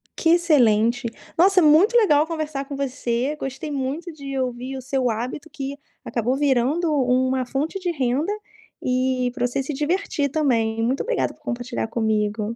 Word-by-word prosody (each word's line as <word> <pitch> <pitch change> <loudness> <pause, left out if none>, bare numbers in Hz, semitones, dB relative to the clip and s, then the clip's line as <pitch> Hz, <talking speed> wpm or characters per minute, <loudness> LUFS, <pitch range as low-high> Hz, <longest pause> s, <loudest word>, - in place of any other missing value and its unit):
Que 330 - +1
excelente! 245 -8 +3 0.3
Nossa, 375 +2 +5
é - - +4
muito 330 +10 +5
legal 310 -10 +4
conversar 310 -4 -3
com 280 - -6
você. 260 0 -1
Gostei 270 +3 -5
muito 285 +6 -3
de 275 -2 -6
ouvir 255 +1 -3
o - - -6
seu 260 -1 0
hábito, 250 +8 -4
que 275 0 -5 0.3
acabou 240 +2 0
virando 285 +4 +2
u 255 -2 +2
uma 260 0 0
fonte 290 +9 -2
de 360 -2 -1
renda 280 +4 0 0.5
e 255 -1 0
pra 245 -2 -1
você 245 +3 -2
se 295 - -4
divertir 300 0 -1
também. 230 -7 +1
Muito 260 +4 0
obrigada - - -1
por - - -27
compartilhar 245 -1 -3
comigo. 215 -1 -1
270 Hz, 165 wpm, -23 LUFS, 245-300 Hz, 0.5 s, Nossa